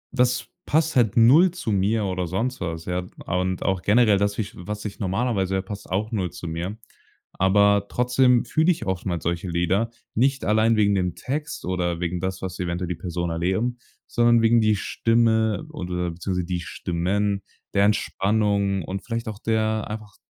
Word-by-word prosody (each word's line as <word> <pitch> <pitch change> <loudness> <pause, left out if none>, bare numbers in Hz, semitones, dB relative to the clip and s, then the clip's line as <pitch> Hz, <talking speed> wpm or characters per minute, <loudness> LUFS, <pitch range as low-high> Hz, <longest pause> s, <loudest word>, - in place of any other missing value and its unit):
das 125 -1 +2 0.2
passt 160 0 +2
halt 120 -3 +3
0 140 +11 +7
zu 175 -11 -4
mir 100 +2 +1
oder 90 -2 -2
sonst 115 +9 -2
was, 80 -2 -4
ja. 90 0 -2 0.2
A 90 - -1
und 95 0 -2
auch 95 -2 0
generell 105 -1 +4
das 100 0 0
wie 110 - +1
ich - - -11
was 105 +4 -6
ich 105 - -6
normalerweise 95 -1 0
ja, 95 - +1
passt 100 0 -8
auch 105 +5 -1
0 95 -6 -1
zu 90 -1 -8
mir. 85 +6 -4 0.6
Aber 100 +1 +3
trotzdem 125 0 +3
fühle 160 +3 +2
ich 155 -10 -3
oftmals 90 -2 -2
solche 85 +2 -2
Lieder, 90 +6 +1 0.3
nicht 135 +3 +1
allein 110 +2 +3
wegen 100 -1 +3
dem 90 -2 -1
Text 150 +3 -4
oder 90 -2 -1
wegen 90 0 -2
das, 95 0 -3
was 95 - -5
eventuell 90 0 -2
die 90 - -2
Person 85 +1 -3
erleben, 95 +9 -1 0.3
sondern 120 -1 +3
wegen 115 +1 +5
die 110 -1 +3
Stimme 115 +3 +1
oder 90 - -3
beziehungsweise 90 +1 -3
die 90 -1 -3
Stimmen, 95 +4 -1 0.3
der 100 0 +4
Entspannung 100 -2 +1
und 95 +4 -5
vielleicht 115 -1 -4
auch 105 -2 -5
der 110 -1 0
einfach 105 -1 -7
100 Hz, 180 wpm, -24 LUFS, 90-115 Hz, 0.6 s, 0